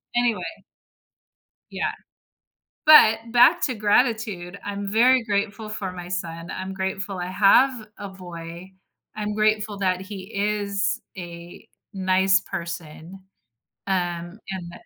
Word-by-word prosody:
anyway. 235 -6 +1 1.3
Yeah. - - -1 1.0
But 225 -8 +8
back 295 +9 +6
to 255 - -2
gratitude, 210 -4 0
I'm 200 0 -4
very 250 +3 +5
grateful 205 +1 -2
for 200 -3 -4
my 175 -1 -8
son, 170 -2 -5
I'm 190 +1 -5
grateful 190 0 -3
I 175 - -3
have 215 +5 +4
a 200 - -6
boy. 175 -1 -10 0.4
I'm 210 -1 -3
grateful 215 -1 +1
that 185 -2 0
he 190 0 -7
is 200 -1 0 0.2
a 175 +2 -10 0.3
nice 190 0 +3
person, 170 -1 -7 0.7
um, 175 0 -2
and 175 -3 -6
195 Hz, 115 wpm, -24 LUFS, 180-215 Hz, 1.3 s, But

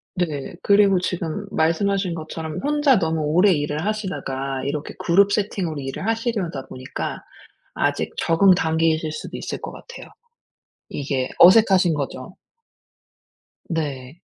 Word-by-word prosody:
네. 155 -6 -3
그리고 200 -2 +4
지금 180 +2 -3
말씀하신 185 +3 +1
것처럼 160 -1 -6
혼자 290 -5 +3
너무 160 -1 -1
오래 180 +7 +4
일을 150 0 -1
하시다가 135 -11 -3
이렇게 145 +2 -4
그룹 195 +4 +3
세팅으로 190 -7 -2
일을 135 +8 -5
하시려다 220 - -2
보니까 130 0 -6 0.5
아직 - - -1
적응 185 +3 +4
단계이실 160 -1 +1
수도 - - -7
있을 - - -5
것 - - -6
같아요. 480 - -11 0.8
이게 135 -2 -2
어색하신 185 -2 +6
거죠. 135 +2 -5 1.3
네. 145 -1 -4
165 Hz, 285 characters per minute, -22 LUFS, 150-195 Hz, 1.3 s, 어색하신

